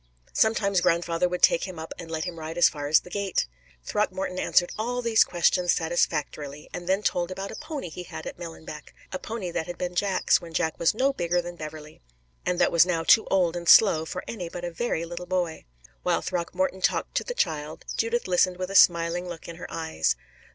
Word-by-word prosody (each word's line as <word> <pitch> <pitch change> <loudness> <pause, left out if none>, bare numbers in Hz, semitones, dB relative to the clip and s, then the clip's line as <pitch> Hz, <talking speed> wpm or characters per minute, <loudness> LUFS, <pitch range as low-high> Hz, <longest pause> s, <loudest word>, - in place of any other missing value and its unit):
Sometimes 200 -4 +2
grandfather 170 +1 +1
would 180 0 -4
take 165 - +5
him 185 -3 -8
up 160 0 -6
and 170 -2 -8
let 160 -1 -2
him 175 -2 -5
ride 160 +1 -6
as 175 - +7
far 145 -1 -4
as 150 +1 +5
the 180 - -14
gate. 200 -1 0 0.4
Throckmorton 190 -3 -1
answered 175 -1 +2
all 245 +3 -2
these 230 -1 +5
questions 175 0 +2
satisfactorily, 150 -3 -2
and 175 - -6
then 195 +2 +2
told 175 -3 0
about 195 +1 -5
a - - -7
pony 305 - -6
he 170 +2 -7
had 160 -3 -8
at - - -6
Millenbeck 160 -3 -9 0.2
a 185 - -2
pony 210 -5 -5
that 160 - -3
had 175 -1 -6
been 180 0 -3
Jack's, 190 +1 +2
when 165 -1 -10
Jack 160 - 0
was 170 +4 +3
no 270 +4 +2
bigger 175 -6 0
than 175 0 -5
Beverley, 155 -1 -9 0.5
and 180 - +1
that 175 - +3
was 170 -1 +6
now 170 -2 -1
too 220 +6 +5
old 180 -3 +2
and 170 -1 -2
slow 170 -7 +7
for 180 +3 -5
any 180 -7 -5
but 175 +1 -6
a 175 - -4
very 170 -3 -2
little 175 +1 -7
boy. 175 -3 -2 0.4
While - - 0
Throckmorton 185 +2 -2
talked - - 0
to - - +1
the - - -5
child, 155 - -2
Judith 230 0 0
listened 180 0 +2
with 185 +1 -4
a - - -5
smiling 175 0 +4
look 170 -2 -8
in 170 - -8
her 175 - -7
eyes. 80 - -1
175 Hz, 215 wpm, -26 LUFS, 165-185 Hz, 0.5 s, as